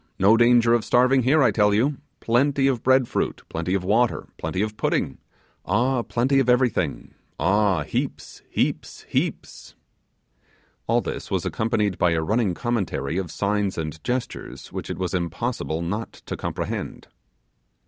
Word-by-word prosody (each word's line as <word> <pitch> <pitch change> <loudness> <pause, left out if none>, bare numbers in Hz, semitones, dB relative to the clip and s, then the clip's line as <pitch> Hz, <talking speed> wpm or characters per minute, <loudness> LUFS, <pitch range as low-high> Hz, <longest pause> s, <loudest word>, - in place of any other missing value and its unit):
no 100 +3 +5
danger 120 0 +5
of 120 -2 +2
starving 130 +2 +4
here, 140 +4 +4
I - - +4
tell 105 -1 +3
you! 135 +6 +1 0.2
plenty 135 +4 +2
of 130 -4 +1
bread 130 -1 +4
fruit - - -2
plenty 85 +3 -2
of 95 - -1
water 110 +6 +1
plenty 95 +2 -1
of 110 0 -4
pudding 70 -10 -1 0.4
ah! 125 +4 +1
plenty 130 +4 +1
of 130 -2 +1
everything! 125 - +1 0.3
ah! 95 -1 +2
heaps, 70 - -4
heaps - - -2
heaps!' - - -3 1.1
All - - +3
this - - -5
was - - -1
accompanied 105 -3 0
by 85 -1 +3
a 80 - +1
running 105 -1 +1
commentary 95 - -2
of 90 -3 -4
signs 100 +2 -1
and 80 -1 -5
gestures 125 0 -4
which - - -5
it - - -4
was 90 -2 -3
impossible 85 -1 -2
not 105 +7 -3
to - - -7
comprehend. - - -4
110 Hz, 150 wpm, -24 LUFS, 90-125 Hz, 1.1 s, no